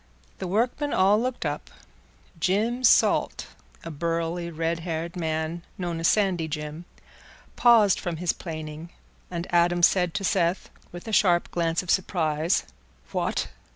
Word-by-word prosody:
The 185 - -4
workmen 240 +9 0
all 200 +3 +4
looked 250 -6 -3
up; 145 0 -3 0.7
Jim 220 +9 0
Salt, 245 - +3 0.4
a 165 - -6
burly, 170 +2 -2
red 165 +1 -2
haired 165 0 -4
man 160 0 -2 0.2
known 175 -3 -3
as 165 - +2
Sandy 190 -6 +2
Jim, 150 +2 -6 0.7
paused 225 -5 +5
from 175 -3 -4
his 175 +1 0
planing, 155 -1 -7 0.4
and 170 -1 -4
Adam 175 0 +3
said 180 -1 +3
to 200 - -2
Seth, 180 -1 0 0.2
with 175 +5 -10
a 220 - -4
sharp 175 -4 +3
glance 165 0 0
of 180 - -2
surprise, 165 -3 +1 0.5
"What! - - -1
175 Hz, 140 wpm, -25 LUFS, 165-190 Hz, 0.7 s, paused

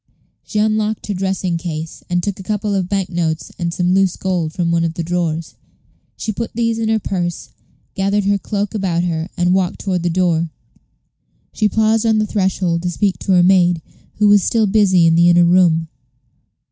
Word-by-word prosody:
She 215 - -6
unlocked 215 0 0
her 205 - -3
dressing 190 -2 -2
case, 160 -1 -6
and 175 0 0
took 200 -2 -3
a - - -6
couple 210 +1 -2
of 185 -2 -1
bank 195 -2 -1
notes 165 -2 -2
and 170 -1 -1
some 180 +1 0
loose 190 -2 +2
gold 180 -4 -2
from 170 0 -1
one 170 0 +1
of 165 -1 -2
the 170 - -3
drawers. 165 -2 -2 0.6
She 220 - -3
put 230 +2 -5
these 230 -1 0
in 220 -1 -1
her 220 - +2
purse, 175 -4 -3 0.4
gathered 200 +1 0
her 200 0 +1
cloak 205 +2 -3
about 185 -5 -1
her, 165 0 -2
and 175 0 +2
walked 185 -2 0
toward 185 -3 -1
the 175 - 0
door. 170 -2 +1 1.0
She 215 -1 +1
paused 220 +2 +2
on 220 -1 +3
the 215 - +1
threshold 185 -4 0
to 180 - -2
speak 195 +2 -1
to 195 - 0
her 180 -1 +5
maid, 175 -3 +3 0.3
who 210 - +2
was 205 -1 +6
still 225 +3 +1
busy 190 -4 +3
in 165 - +4
the 170 +1 +5
inner 175 0 +5
room. 170 -2 +3
185 Hz, 195 wpm, -18 LUFS, 170-205 Hz, 1.0 s, was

